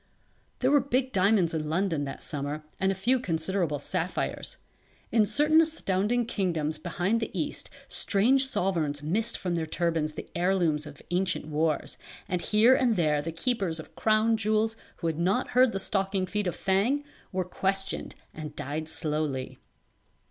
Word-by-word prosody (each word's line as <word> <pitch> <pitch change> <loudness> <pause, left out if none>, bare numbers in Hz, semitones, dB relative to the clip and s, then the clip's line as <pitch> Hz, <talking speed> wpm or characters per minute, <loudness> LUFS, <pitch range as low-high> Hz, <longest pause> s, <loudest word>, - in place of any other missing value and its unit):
There 260 +1 +3
were 290 - +6
big 260 0 0
diamonds 190 -3 +3
in 155 -2 -2
London 165 -3 0
that 135 - -7
summer 145 +1 -4 0.2
and 190 0 +2
a - - -2
few 245 +7 +2
considerable 170 -5 0
sapphires. 165 +4 -2 0.5
In 215 -3 +4
certain 310 +5 +4
astounding 240 - +1
kingdoms 165 -8 -1
behind 185 +5 0
the 225 - -3
East - - -3 0.2
strange 260 +7 +2
sovereigns 160 - -1
missed 220 +9 0
from 180 -2 -2
their 165 -2 -1
turbans 160 -2 -1
the - - -7
heirlooms 170 -4 +1
of 145 -2 -12
ancient 180 -2 0
wars, 155 0 -1 0.3
and 180 -2 -1
here 215 +7 +5
and 245 -3 +3
there 155 -5 +2
the 165 +3 -4
keepers 180 -2 0
of 160 - -11
crown 220 +1 +3
jewels 220 +1 +1 0.2
who - - -6
had 165 -1 -1
not 195 +9 +1
heard 255 -1 +5
the 195 - -2
stockinged 195 -1 -1
feet 210 0 0
of 175 - -2
Thang, 210 +10 +1 0.3
were 185 -2 -1
questioned 195 +1 -2 0.2
and 150 -1 -7
died 155 +3 -4
slowly. 150 -5 -2
185 Hz, 160 wpm, -28 LUFS, 160-220 Hz, 0.5 s, were